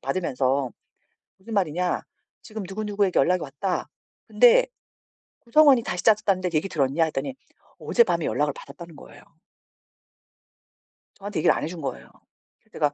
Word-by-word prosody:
받으면서. 135 -6 -1 0.7
무슨 220 +4 -8
말이냐 180 -2 0 0.4
지금 215 -1 -7
누구누구에게 205 -1 -1
연락이 180 0 +2
왔다 145 +7 -3 0.4
근데 - - +5 0.7
구성원이 265 0 +5
다시 180 -5 -4
짜졌다는데 200 -4 +2
얘기 155 +5 0
들었냐 145 +1 +1
했더니 155 - -4 0.4
어젯밤에 175 -9 +1
연락을 145 +5 0
받았다는 170 -3 -12
거예요. - - -15 1.9
저한테 200 -3 -5
얘기를 - - +4
안 - - -4
해 - - -2
준 170 -2 -8
거예요. 65 - -6 0.5
그래서 - - -36
제가 145 -1 0
180 Hz, 345 characters per minute, -24 LUFS, 150-210 Hz, 1.9 s, 근데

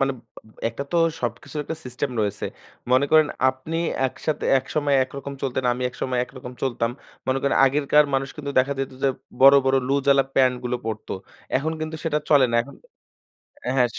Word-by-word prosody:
বানে 135 0 +2 0.3
আব 110 - -20 0.2
একটা 115 +5 -5
তো - - +2 0.2
সবকিছুর 120 +5 -4
একটা 160 - -5
সিস্টেম 125 +2 -3
রয়েছে। 105 -1 -2 0.5
মনে 130 +2 +5
করেন 155 -1 +6 0.2
আপনি 130 +5 -4 0.3
একসাথে 150 +4 -3
একসময় 145 +2 -1
একরকম 140 +1 -8
চলতেন, 130 -1 -1
আমি 125 +1 -4
একসময় 125 0 -3
একরকম 125 -1 -10
চলতাম। 120 -3 0 0.4
মনে 130 0 +1
করেন 140 - +2
আগেরকার 145 +2 +4
মানুষ 135 0 0
কিন্তু 145 -2 -5
দেখা 135 +2 +3
যেত 135 -1 -2
যে 135 - +4 0.3
বড়, 135 +1 +9
বড় 135 0 +3
লুজ-ওয়ালা 140 0 +4
প্যান্টগুলো 125 -1 +2
পরতো। 110 -1 -4 0.4
এখন 155 +4 -1
কিন্তু 160 0 -4
সেটা 150 -2 +1
চলে 140 -3 +6
না। - - -2
এখন 140 - -13 0.9
এ - - +1
হ্যাঁ 125 -2 +4
135 Hz, 170 wpm, -23 LUFS, 125-140 Hz, 0.9 s, বড়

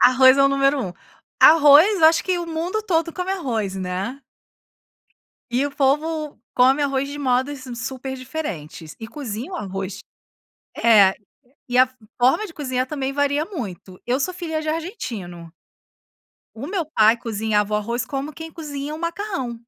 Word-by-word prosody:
Arroz 260 +1 +6
é 275 - +6
o 275 - +5
número 275 0 +2
1. 180 -4 -5 0.5
Arroz 315 +5 +7
eu 315 - +8
acho 325 +1 +4
que 365 -2 0
o 345 - -4
mundo 335 +6 -2
todo 335 -5 0
come 365 +1 -4
arroz, 230 - -2
né. 190 +8 -4 1.3
E 255 +4 +1
o 285 - -4
povo 300 +2 0 0.2
come 265 +3 +4
arroz 275 -1 0
de 285 +1 -7
modos 260 0 -1
super 265 +3 -5
diferentes, 205 - -6
e 225 - -7
cozinha 255 - -6
o - - -2
arroz. 195 - -5 0.8
É. 205 -5 +6 0.6
E 245 - +1
a 255 0 +6 0.3
forma 270 - +3
de 335 - -11
cozinhar 255 -4 -2
também 275 -2 -3
varia 285 +2 +1
muito. 195 - -8
Eu 250 +2 0
sou 365 +6 -1
filha 325 -3 -4
de 310 - -7
argentino. 230 - -5 1.0
O 235 +5 -7
meu 365 -3 -2
pai 225 -7 +4
cozinhava 215 -2 -1
o - - +3
arroz 235 +3 -2
como 275 +4 -4
quem 320 +1 -9
cozinha 295 -2 -6
o - - -9
macarrão. 335 - -4
275 Hz, 160 wpm, -22 LUFS, 230-315 Hz, 1.3 s, eu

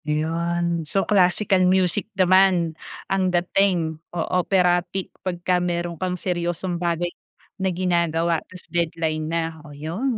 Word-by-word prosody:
'Yon 170 +2 -1
so 180 +5 0
classical 190 0 +3
music 185 +2 +2
naman, 185 -3 +4 0.3
ang 190 -1 +1
dating 175 -3 +1
o 170 -2 -2 0.2
operatic 180 0 +1
pagkameron 175 -1 -1
kang 180 -1 -1
seryosong 175 0 -2
bagay 175 0 -1 0.5
na 190 - +2
ginagawa 170 -2 +1
tapos 185 -1 -11
deadline 160 -2 -1
na, 165 -1 -2
oh 150 - -13
yun 170 - -3
175 Hz, 120 wpm, -23 LUFS, 165-185 Hz, 0.5 s, naman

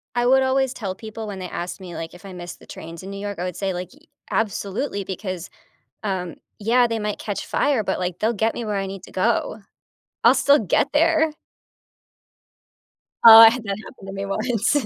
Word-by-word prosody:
I 240 0 +1
would 265 +2 +5
always 265 0 +1
tell 195 -7 -4
people 220 +1 -8
when 200 -2 -6
they 180 -2 -6
ask 175 +3 -5
me, 180 -3 -9
like, 165 0 -6
if 180 +2 -14
I 190 - -9
miss 175 -1 -8
the - - -19
trains 165 +1 -9
in 190 - -8
New 200 - -6
York, 205 -2 -5
I - - -2
would 180 - -4
say, 195 -2 -2
like, 180 0 -5
"Y 290 - -20 0.3
absolutely, 205 +1 -2
because, 185 -2 -5 0.5
um, 185 -5 -3 0.2
yeah, 240 +4 +3
they 230 -1 -1
might 210 -1 -3
catch 205 -2 -4
fire, 270 -7 +1
but, 190 - -1
like, 180 -1 -3
they'll 220 +2 +1
get 220 +1 0
me 235 - -4
where 210 -2 -2
I 195 0 -1
need 195 -1 -7
to - - -14
go. 220 +2 0 0.6
I'll 240 +3 +7
still 280 +3 +5
get 220 +6 +1
there." 320 0 +3 1.9
Oh, 225 -1 +12
I 225 0 +11
had 240 0 -4
that 200 -2 -3
happen 225 - -13
to - - -6
me 195 0 -4
once. 230 +5 0
210 Hz, 215 wpm, -22 LUFS, 190-240 Hz, 1.9 s, Oh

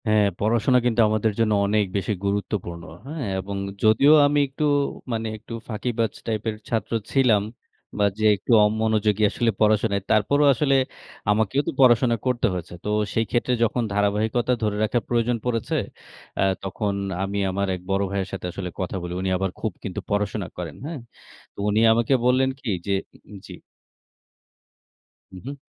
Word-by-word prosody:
হ্যাঁ, 105 -1 +4
পড়াশোনা 115 +4 +2
কিন্তু 120 -1 +3
আমাদের 110 0 +1
জন্য 110 -2 +3
অনেক 105 +1 +2
বেশি 100 +2 -1
গুরুত্বপূর্ণ, 100 -4 -3 0.2
হ্যাঁ? 150 -3 -4
এবং 100 +1 -5 0.3
যদিও 115 +7 +6
আমি 145 0 +2
একটু, 135 +3 -5 0.5
মানে 115 -1 -2
একটু 110 - -11 0.2
ফাঁকিবাজ 115 0 -1 0.2
টাইপের 110 0 -2
ছাত্র 115 -2 -2 0.2
ছিলাম 120 -7 +3 0.5
বা 105 - +3
যে, 110 - +1
একটু 100 - -5
অমনোযোগী 110 -1 +1
আসলে 115 +2 0
পড়াশোনা, 105 -1 +3 0.2
তারপরেও 140 +8 +3
আসলে 135 +2 +2 0.6
আমাকেও 110 +6 +1
তো - - +1
পড়াশোনা 120 -1 +5
করতে 125 -2 +1
হয়েছে। 90 -1 -6
তো - - -1 0.2
সেই 115 - +1
ক্ষেত্রে 125 +1 0
যখন 120 +2 +1
ধারাবাহিকতা 105 +4 +1
ধরে 105 -1 0
রাখার 115 +1 0
প্রয়োজন 120 0 +1
পড়েছে, 115 -3 -1 0.7
আ - - +4 0.2
তখন 100 +1 -2 0.3
আমি 100 +1 -3
আমার 100 +1 -1
এক 90 - -9
বড় 95 +1 +1
ভাইয়ের 100 -1 -2
সাথে 95 - -5
আসলে 90 0 -5
কথা 95 0 -3
বলি। 90 0 -5
উনি 95 - -1
আবার 95 +1 -1
খুব 110 - -2
কিন্তু 100 0 -4
পড়াশোনা 100 -1 -1
করেন। 85 -4 -6
হ্যাঁ? 155 -1 -5 0.5
তো - - -15
উনি 105 +1 +2
আমাকে 115 +3 +1
বললেন 130 +1 +3
কি 125 - -5 0.2
যে, 100 - +1 0.2
উ-উম 105 - -13
জি। - - -9 1.8
হুম, 95 - -10
হুম। 140 +2 -5
110 Hz, 160 wpm, -24 LUFS, 100-120 Hz, 1.8 s, যদিও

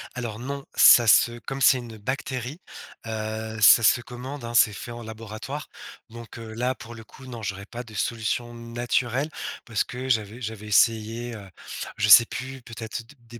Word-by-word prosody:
Alors, 115 -4 -4
non, 140 +3 -5
ça 120 -2 +8
se 120 +2 +5
comme 135 +3 -6
c'est 130 0 +5
une 115 -3 -9
bactérie, 130 - -4 0.5
heu, 110 0 -4
ça 110 +4 +8
se 115 - +4
commande, 125 +3 -8
hein, 115 0 -6
c'est 115 -2 +5
fait 120 - -8
en 120 0 -8
laboratoire. 110 +6 -7 0.4
Donc, 115 0 -10
heu, 115 -1 -8
là, 125 +3 -1
pour 115 0 -11
le 115 -1 -11
coup, 130 +4 -15
non 120 -3 -8
j'aurais 100 -1 -5
pas 120 +4 -7
de 110 -3 -13
solution 115 +3 -2
naturelle 120 +3 -2 0.4
parce 115 -3 0
que 130 +2 -7
j'avais 110 -1 0
j'avais 110 -3 -6
essayé, 115 +2 +2
heu, 100 -3 -10 0.5
je 105 - +1
sais 115 +4 +10
plus, 130 0 -6
peut-être, 115 0 -7
des 120 -4 -15
115 Hz, 180 wpm, -25 LUFS, 110-125 Hz, 0.5 s, sais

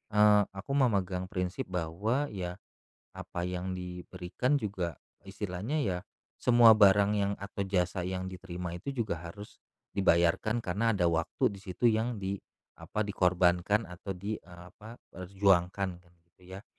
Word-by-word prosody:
eee, 105 0 +6
aku 100 +8 -6
memegang 95 -7 +1
prinsip 90 0 -3
bahwa, 95 - -1
ya, 90 -3 -4 0.6
apa 90 0 -5
yang 90 +1 -3
diberikan 90 +8 -2
juga, 95 - -3 0.2
istilahnya 100 - -4
ya, 95 -11 0 0.4
semua 120 -2 +8
barang 100 -1 +5
yang 100 -1 +1
atau 100 0 -4
jasa 90 -1 0
yang 95 +1 -3
diterima 90 -2 -6
itu 90 +10 -5
juga 115 -9 -2 0.2
harus 105 +4 -12 0.3
dibayarkan 95 +4 +3
karena 110 +2 0
ada 100 -5 +2
waktu 85 +4 +1
di 100 - -11
situ 95 +4 -1
yang 115 0 +1
di 95 0 -2 0.5
apa, 110 - -2
dikorbankan 90 +1 +2
atau 90 +1 -7
di, 105 +4 -4
e - - -25
apa, 105 +6 -12 0.2
perjuangkan 95 0 +1 0.3
gitu 95 - -28
ya. 100 - -11
95 Hz, 140 wpm, -30 LUFS, 90-105 Hz, 0.6 s, semua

